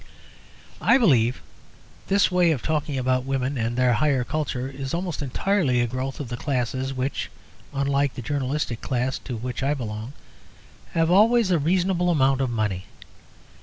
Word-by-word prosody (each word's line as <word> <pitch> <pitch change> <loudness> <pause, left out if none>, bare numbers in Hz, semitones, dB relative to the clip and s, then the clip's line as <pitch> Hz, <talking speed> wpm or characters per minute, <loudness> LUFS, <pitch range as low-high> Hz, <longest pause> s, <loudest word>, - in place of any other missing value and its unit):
I - - +5
believe 130 - +3 0.6
this 200 -1 +3
way 180 -1 +4
of 150 -7 0
talking 150 -3 -1
about 130 0 +1
women 135 +1 -1
and 120 0 -2
their 125 -1 +4
higher 130 +2 +2
culture 130 -2 -2
is 135 +2 -4
almost 175 -3 -3
entirely 145 - +1
a 120 - +3
growth 130 +3 -4
of 140 -5 -5
the 120 - -4
classes 130 0 -2
which 135 +1 -3 0.4
(unlike 140 0 0
the 125 - -6
journalistic 140 -3 -2
class 130 0 -1
to 125 -3 -6
which 125 +3 -5
I 140 +2 +1
belong) 110 0 -5 0.8
have 165 0 +2
always 220 +1 +5
a 170 - +3
reasonable 180 +3 +1
amount 135 -4 +3
of 130 - 0
money. 105 -5 -2
135 Hz, 160 wpm, -24 LUFS, 125-155 Hz, 0.8 s, I